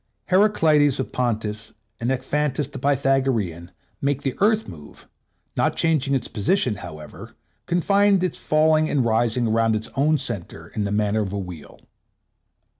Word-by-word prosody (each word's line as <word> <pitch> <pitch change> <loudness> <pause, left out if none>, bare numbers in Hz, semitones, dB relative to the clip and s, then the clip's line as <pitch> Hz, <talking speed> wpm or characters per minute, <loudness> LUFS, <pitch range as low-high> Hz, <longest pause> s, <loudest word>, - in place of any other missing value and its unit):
Heraklides 160 -8 +4
of 130 - -3
Pontus 110 -4 -2 0.3
and 115 - -2
Ekphantus 145 +1 -1
the 135 - -7
Pythagorean 130 - 0 0.3
make 140 0 -1
the 135 - -1
Earth 215 +2 +2
move, 75 -4 -12 0.5
not - - +1
changing 150 -4 +1
its 130 - -2
position, 110 - 0
however, 75 -4 -10 0.3
confined 195 +2 +3
in - - +4
its - - -11
falling 155 0 +2
and 135 -4 +1
rising 115 +1 +1
around 115 0 +2
its 110 +1 -4
own 150 +3 +3
center 85 - -4
in 105 - -3
the 100 - -2
manner 105 +1 +1
of 100 -3 -3
a - - -2
wheel." 90 -5 -8
130 Hz, 150 wpm, -23 LUFS, 105-150 Hz, 0.5 s, Heraklides